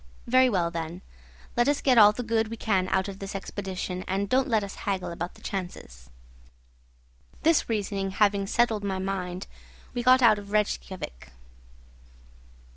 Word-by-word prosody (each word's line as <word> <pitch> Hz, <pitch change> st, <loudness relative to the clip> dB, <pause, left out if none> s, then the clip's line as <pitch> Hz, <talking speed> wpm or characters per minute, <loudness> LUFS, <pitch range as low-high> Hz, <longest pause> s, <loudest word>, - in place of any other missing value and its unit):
Very 255 Hz, +1 st, +5 dB
well, 175 Hz, -6 st, 0 dB
then; 170 Hz, +2 st, -5 dB, 0.5 s
let 240 Hz, +1 st, +3 dB
us 290 Hz, 0 st, +2 dB
get 255 Hz, -4 st, +4 dB
all 210 Hz, -1 st, +9 dB
the 245 Hz, +4 st, -5 dB
good 225 Hz, -1 st, +1 dB
we 230 Hz, +1 st, -6 dB
can 195 Hz, -5 st, +1 dB
out 190 Hz, +1 st, 0 dB
of 195 Hz, -1 st, -7 dB
this 195 Hz, +1 st, -6 dB
expedition, 190 Hz, -2 st, -4 dB
and 195 Hz, +2 st, -1 dB
don't 260 Hz, +3 st, +2 dB
let 220 Hz, -5 st, +2 dB
us 200 Hz, -, -6 dB, 0.2 s
haggle 185 Hz, -3 st, -2 dB
about 175 Hz, +1 st, -5 dB
the -, -, -18 dB
chances." 65 Hz, -, -6 dB, 1.3 s
This 320 Hz, -4 st, +3 dB
reasoning 200 Hz, -3 st, -1 dB
having 200 Hz, 0 st, +2 dB
settled 225 Hz, -2 st, +1 dB
my 195 Hz, -2 st, -2 dB
mind, 185 Hz, -1 st, -3 dB, 0.5 s
we 245 Hz, -, -2 dB
got 255 Hz, +1 st, +5 dB
out 215 Hz, -3 st, +6 dB
of 200 Hz, -, -11 dB
Rejkiavik. 190 Hz, -, -2 dB
200 Hz, 160 wpm, -27 LUFS, 185-225 Hz, 1.3 s, all